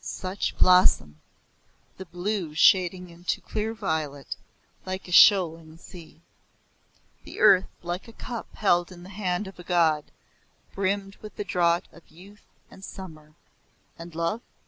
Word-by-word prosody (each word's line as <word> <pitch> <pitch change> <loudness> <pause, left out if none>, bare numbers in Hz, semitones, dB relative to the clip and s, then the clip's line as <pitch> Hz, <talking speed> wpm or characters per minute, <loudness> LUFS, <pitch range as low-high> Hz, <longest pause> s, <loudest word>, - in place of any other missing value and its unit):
Such 185 +1 -4
blossom! 75 - +4 0.8
the 190 - -9
blue 175 -2 -3
shading 180 +1 +3
into 175 +1 -3
clear 220 +1 -4
violet, 155 - -3 0.5
like 185 0 -6
a - - -9
shoaling 165 -5 +5
sea. 165 -2 -14 1.0
The - - -10
earth, 190 -1 +5
like 175 +4 -5
a - - -11
cup 235 -1 -7
held 175 -3 +2
in 175 -1 -12
the 185 - -12
hand 195 -1 -2
of 190 -1 -11
a - - -9
god, 165 -4 +2 0.7
brimmed 195 0 -2
with 215 - -11
the - - -4
draught 175 -2 +1
of 170 - -16
youth 195 +5 -17 0.2
and 190 - -14
summer 155 -6 -11 0.6
and 165 0 -11
love? 170 +7 -2
180 Hz, 140 wpm, -26 LUFS, 165-195 Hz, 1.0 s, shoaling